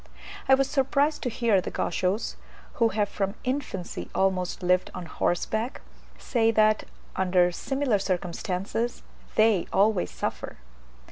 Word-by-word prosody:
I 265 - +9
was 270 0 +1
surprised 280 +2 +1
to 250 - -1
hear 225 -4 +2
the - - -5
Gauchos, 185 +5 -1 0.5
who 230 - +7
have 210 -1 0
from 195 0 -2
infancy 255 -9 -3
almost 185 -1 0
lived 180 +1 +2
on 180 - -5
horseback, 220 +8 -1 0.4
say 225 -2 +1
that, 215 -1 +3 0.3
under 180 -1 +3
similar 265 +2 0
circumstances, 190 +4 -2 0.3
they 215 -4 +4
always 200 -1 +3
suffer. - - -4
205 Hz, 125 wpm, -27 LUFS, 185-235 Hz, 0.5 s, I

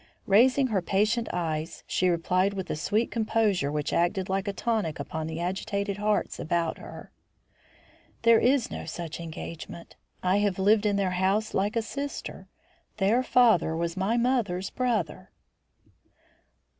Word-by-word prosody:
Raising 255 +7 +5
her 190 - +2
patient 210 +6 +1
eyes, 160 -2 -3
she 185 - +1
replied 185 +3 +1
with 190 -2 -4
a - - -1
sweet 210 +9 0
composure 215 -9 +1
which 150 -1 -2
acted 180 +2 +1
like 195 +1 -1
a - - +1
tonic 200 -6 -1
upon 160 +2 -4
the 160 0 -5
agitated 200 +3 -2
hearts 210 0 0
about 165 0 -1
her: - - -10 1.1
"There 230 -1 +6
is 255 0 +2
no - - -5
such 170 -2 -6
engagement. 170 0 -8 0.3
I 185 +2 +3
have 205 -2 +1
lived 210 +2 +3
in 205 - +1
their 195 -2 +1
house 195 +4 0
like 205 +4 0
a 230 - +1
sister. 280 +5 -6 0.5
Their 215 +5 +3
father 225 -11 +3
was 170 0 -2
my 195 +5 0
mother's 230 -7 0
brother." 220 -11 -2
195 Hz, 145 wpm, -27 LUFS, 175-220 Hz, 1.1 s, There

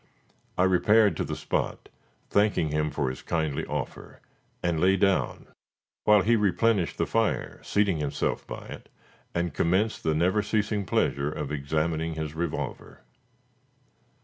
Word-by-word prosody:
I 90 - +4
repaired 105 +3 +4
to - - 0
the - - -4
spot, - - -2 0.4
thanking 100 -6 +2
him 75 +1 0
for 70 -3 -1
his 65 - -9
kindly 80 -4 -2
offer, - - -5 0.4
and 85 -2 +1
lay 95 +3 +4
down, 95 0 +1 0.6
while 105 -2 +6
he 115 +4 +4
replenished 105 -5 +1
the - - +1
fire, - - -1
seating 100 -4 +1
himself 75 -2 -2
by - - -7
it, - - -10 0.5
and 85 0 -1
commenced 95 +6 +1
the 80 -1 0
never 90 +6 +2
ceasing 105 -2 -1
pleasure 70 -2 +1
of 75 -2 -4
examining 80 +3 -1
his 80 -1 -4
revolver. 85 -1 -4
85 Hz, 140 wpm, -27 LUFS, 75-100 Hz, 0.6 s, while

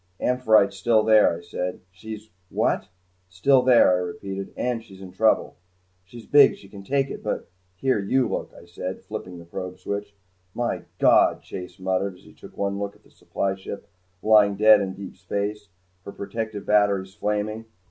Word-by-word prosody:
"'Amphitrite's' 110 -6 +3
still 110 +2 +3
there," 110 -6 +5
I - - -11
said. 90 +1 -4
"She's 110 +3 -10 0.2
what?" - - 0 0.4
"Still 130 +9 +3
there," 125 -6 +6
I 90 - +3
repeated. 95 +2 -5
"And 120 -2 -2
she's 95 -4 -15
in 95 -1 -10
trouble." 110 +4 +1 0.5
"She's 115 +4 -12
big. 145 -2 +6
She 100 - -16
can 100 - -10
take 135 +4 0
it - - -7
but - - -4
" 90 0 -42
"Here, 130 +3 +1
you 125 +5 +1
look," - - -4
I - - -15
said, 90 +2 -6
flipping 90 -4 -7
the 85 - -11
probe 90 +2 -6
switch. 100 +2 -5 0.4
"My 120 0 -2
God!" - - +4
Chase 90 -1 -8
muttered 95 +1 -1
as - - -21
he - - -17
took - - -15
one 100 0 -1
look 100 0 -4
at - - -25
the - - -24
supply 95 -1 -3
ship 95 +1 -8 0.4
lying 105 -2 +5
dead 105 0 +6
in 95 0 -6
space, 100 +2 -4 0.3
her 100 - -8
protective 110 0 -5
batteries 100 -2 +2
flaming. 105 +2 -2
100 Hz, 180 wpm, -24 LUFS, 95-110 Hz, 0.5 s, there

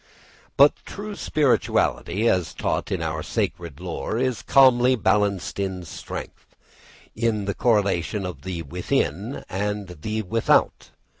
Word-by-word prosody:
But 140 +2 +7
true 205 0 -7
spirituality, 125 - +1
as 90 -6 +1
taught - - -2
in - - -1
our - - -2
sacred 85 -4 -3
lore, 90 +4 -4
is 130 -1 0
calmly 130 -2 +5
balanced 100 -4 0
in 95 -2 -2
strength, 80 - -8 0.6
in 110 -2 0
the 100 - -1
correlation 100 -4 +1
of 85 -7 -6
the 90 -3 -5
within 85 - -2
and 105 0 -3
the 110 +3 -2
without. 110 +4 +1
105 Hz, 125 wpm, -24 LUFS, 90-120 Hz, 0.6 s, But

